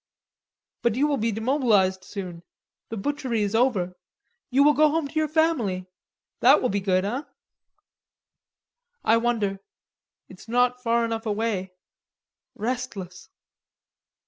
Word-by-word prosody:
"But 235 Hz, -2 st, +1 dB
you 275 Hz, +4 st, +2 dB
will 295 Hz, -2 st, +1 dB
be 230 Hz, 0 st, 0 dB
demobilized 220 Hz, -5 st, +2 dB
soon; 185 Hz, -3 st, -7 dB, 0.5 s
the 225 Hz, -, -5 dB
butchery 250 Hz, -1 st, -1 dB
is 200 Hz, 0 st, -2 dB
over. 225 Hz, -7 st, +1 dB, 0.6 s
You 270 Hz, +2 st, +4 dB
will 295 Hz, +1 st, +6 dB
go 305 Hz, +1 st, +4 dB
home 315 Hz, -1 st, 0 dB
to -, -, -15 dB
your 310 Hz, -1 st, +1 dB
family. 285 Hz, -, +1 dB, 0.5 s
That -, -, +6 dB
will 250 Hz, -, 0 dB
be 200 Hz, -, 0 dB
good, 185 Hz, -1 st, +1 dB
hein?" 245 Hz, +9 st, -3 dB, 1.8 s
"I 225 Hz, -, +4 dB
wonder. 225 Hz, -5 st, 0 dB, 0.7 s
It's 185 Hz, +4 st, -14 dB
not 250 Hz, +1 st, +2 dB
far 235 Hz, -1 st, +2 dB
enough 225 Hz, 0 st, -3 dB
away. 205 Hz, -3 st, -2 dB, 0.8 s
Restless!" 215 Hz, -6 st, -5 dB
230 Hz, 125 wpm, -25 LUFS, 195-260 Hz, 1.8 s, will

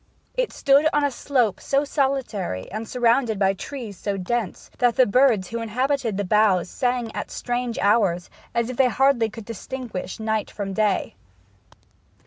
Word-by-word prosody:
It -, -, -1 dB
stood 280 Hz, +2 st, +4 dB
on 295 Hz, 0 st, +2 dB
a 285 Hz, -, +2 dB
slope 250 Hz, -5 st, 0 dB
so 275 Hz, +1 st, +1 dB
solitary, 265 Hz, -, -2 dB
and 215 Hz, +2 st, -5 dB
surrounded 240 Hz, -2 st, +2 dB
by 195 Hz, -1 st, +3 dB
trees 215 Hz, -1 st, -7 dB
so 200 Hz, -1 st, -2 dB
dense, 210 Hz, +2 st, -3 dB
that 245 Hz, -2 st, +3 dB
the 255 Hz, -, +5 dB
birds 225 Hz, -4 st, +3 dB
who 230 Hz, 0 st, -3 dB
inhabited 245 Hz, -1 st, -1 dB
the 205 Hz, -, 0 dB
boughs 195 Hz, -3 st, +3 dB
sang 245 Hz, -3 st, -1 dB
at -, -, -4 dB
strange 245 Hz, -1 st, -3 dB
hours, 200 Hz, -4 st, +2 dB, 0.3 s
as 235 Hz, +1 st, 0 dB
if 250 Hz, -, -8 dB
they 265 Hz, -2 st, +4 dB
hardly 255 Hz, -2 st, +3 dB
could 215 Hz, 0 st, -10 dB
distinguish 230 Hz, -3 st, -6 dB
night 220 Hz, -1 st, -1 dB
from 195 Hz, -2 st, -5 dB
day. 210 Hz, -1 st, 0 dB
230 Hz, 160 wpm, -23 LUFS, 205-260 Hz, 0.3 s, the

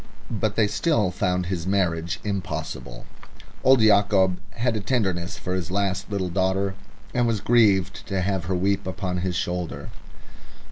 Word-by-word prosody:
But 110 Hz, -1 st, -1 dB
they 110 Hz, -, +4 dB
still 105 Hz, -, +1 dB
found 90 Hz, -1 st, 0 dB
his 85 Hz, -1 st, -3 dB
marriage 85 Hz, -4 st, 0 dB
impossible. 95 Hz, -, -4 dB, 0.6 s
Old 130 Hz, -2 st, +6 dB
Yacob 100 Hz, -3 st, +4 dB, 0.2 s
had 120 Hz, 0 st, 0 dB
a -, -, 0 dB
tenderness 95 Hz, -7 st, -1 dB
for 90 Hz, -, -4 dB
his 90 Hz, -3 st, -2 dB
last 100 Hz, 0 st, -1 dB
little 100 Hz, -3 st, -2 dB
daughter, 95 Hz, +2 st, 0 dB, 0.4 s
and 120 Hz, -1 st, +2 dB
was 115 Hz, -2 st, +1 dB
grieved 105 Hz, -4 st, +3 dB
to 95 Hz, -3 st, -1 dB
have 95 Hz, -2 st, -1 dB
her 95 Hz, +2 st, -1 dB
weep 95 Hz, +1 st, 0 dB
upon 95 Hz, -1 st, -3 dB
his 90 Hz, 0 st, -2 dB
shoulder. 90 Hz, -1 st, -3 dB
95 Hz, 150 wpm, -24 LUFS, 90-105 Hz, 0.6 s, Old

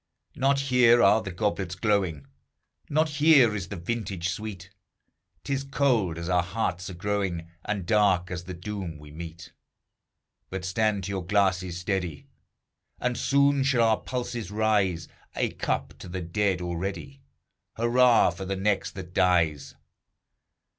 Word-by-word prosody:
Not 135 Hz, +1 st, +2 dB
here 125 Hz, -3 st, +5 dB
are 110 Hz, 0 st, +5 dB
the 105 Hz, -, -6 dB
goblets 95 Hz, -1 st, -2 dB
glowing, 95 Hz, -8 st, 0 dB, 0.6 s
Not 155 Hz, +2 st, +2 dB
here 145 Hz, -6 st, +5 dB
is 95 Hz, -5 st, -4 dB
the 100 Hz, -, -6 dB
vintage 95 Hz, -1 st, -3 dB
sweet; 95 Hz, 0 st, -6 dB, 0.7 s
'T 140 Hz, -, -2 dB
is 135 Hz, 0 st, -1 dB
cold, 125 Hz, -, +1 dB
as 85 Hz, 0 st, -5 dB
our 90 Hz, -1 st, +3 dB
hearts 90 Hz, -1 st, -3 dB
are 90 Hz, -, -7 dB
growing, 90 Hz, -3 st, -2 dB
And 100 Hz, -3 st, -2 dB
dark 95 Hz, -4 st, +2 dB
as 90 Hz, -1 st, -5 dB
the 90 Hz, 0 st, -6 dB
doom 95 Hz, -3 st, -6 dB
we 75 Hz, 0 st, -13 dB
meet. 85 Hz, +2 st, -9 dB, 1.0 s
But 95 Hz, -1 st, -5 dB
stand 100 Hz, +1 st, 0 dB
to 95 Hz, -, -4 dB
your 95 Hz, -2 st, -3 dB
glasses, 95 Hz, -2 st, +1 dB
steady! 90 Hz, -4 st, -3 dB, 0.7 s
And 125 Hz, 0 st, -1 dB
soon 140 Hz, +1 st, +3 dB
shall 130 Hz, -3 st, +3 dB
our 110 Hz, -, +3 dB
pulses 120 Hz, -5 st, -4 dB
rise; 105 Hz, -6 st, +1 dB, 0.3 s
A -, -, 0 dB
cup -, -, -3 dB
to 90 Hz, -, -9 dB
the 90 Hz, +1 st, -4 dB
dead 90 Hz, +2 st, 0 dB
already 95 Hz, +11 st, -5 dB, 0.5 s
Hurrah 120 Hz, -2 st, +4 dB
for 90 Hz, +2 st, -7 dB
the 95 Hz, +1 st, -2 dB
next 100 Hz, +1 st, -1 dB
that 90 Hz, -2 st, -8 dB
dies! 80 Hz, -6 st, +2 dB
95 Hz, 145 wpm, -26 LUFS, 90-115 Hz, 1.0 s, here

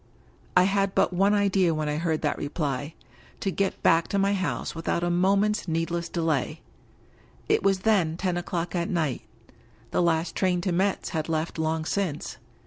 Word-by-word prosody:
I 180 Hz, -, +7 dB
had 195 Hz, 0 st, +1 dB
but -, -, +2 dB
one 195 Hz, +3 st, +3 dB
idea 195 Hz, -4 st, +2 dB
when 155 Hz, -1 st, -2 dB
I 150 Hz, 0 st, -1 dB
heard 160 Hz, -1 st, -1 dB
that 150 Hz, -, 0 dB
reply 145 Hz, 0 st, -3 dB, 0.2 s
— -, -, -26 dB
^to 195 Hz, -, -2 dB
get 195 Hz, -1 st, -1 dB
back 165 Hz, 0 st, +4 dB
to 200 Hz, -, -1 dB
my 200 Hz, +1 st, +2 dB
house 185 Hz, -7 st, -2 dB
without 165 Hz, +1 st, -2 dB
a 175 Hz, -, +1 dB
moment's 200 Hz, +4 st, +2 dB
needless 165 Hz, +1 st, -1 dB
delay. 160 Hz, -6 st, -1 dB, 0.9 s
It -, -, +3 dB
was 195 Hz, -1 st, +2 dB
then 185 Hz, -7 st, +2 dB
ten 180 Hz, -1 st, -1 dB
o'clock 175 Hz, 0 st, -3 dB
at 170 Hz, -1 st, -1 dB
night 155 Hz, -7 st, -1 dB, 0.4 s
— -, -, -30 dB
^the -, -, +2 dB
last 165 Hz, 0 st, +1 dB
train 185 Hz, -2 st, +1 dB
to 185 Hz, -, -1 dB
Metz 190 Hz, +3 st, 0 dB
had 160 Hz, -2 st, -3 dB
left 160 Hz, +1 st, -2 dB
long 160 Hz, 0 st, -1 dB
since. 165 Hz, -8 st, -2 dB
175 Hz, 185 wpm, -26 LUFS, 160-195 Hz, 0.9 s, I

